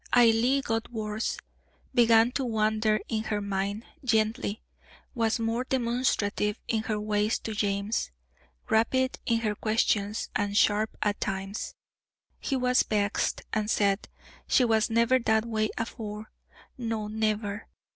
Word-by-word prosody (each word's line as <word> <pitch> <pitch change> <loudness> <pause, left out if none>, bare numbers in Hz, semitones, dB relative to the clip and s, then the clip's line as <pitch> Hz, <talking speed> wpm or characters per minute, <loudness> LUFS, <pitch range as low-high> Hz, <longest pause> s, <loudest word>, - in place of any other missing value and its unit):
Ailie 240 +3 +5
got 225 -1 -2
worse; 215 -1 -2 0.6
began 230 -1 +5
to 270 - -1
wander 215 -2 +1
in 220 -1 -2
her 210 -1 -1
mind, 200 +2 -2 0.2
gently; 220 -2 0 0.5
was 230 -2 +1
more 230 +2 -1
demonstrative 235 -5 0
in 220 -2 +1
her 215 -1 -2
ways 210 +1 +1
to 220 - -5
James, 200 - -1 0.6
rapid 260 +4 +2
in 230 -1 +2
her 215 -2 0
questions, 215 -1 0
and 205 -1 0
sharp 215 0 +2
at 205 -1 -1
times. 195 +1 -3 0.6
He 275 - -2
was 250 -1 +3
vexed, 205 -1 0
and 215 -1 0
said, 200 -2 +1 0.4
"She 255 - +4
was 220 -1 +2
never 235 +3 +3
that 220 -2 +2
way 220 -2 0
afore; 215 -1 -5 0.5
no, 225 -3 -2
never." 215 -1 -2
220 Hz, 130 wpm, -28 LUFS, 210-230 Hz, 0.6 s, Ailie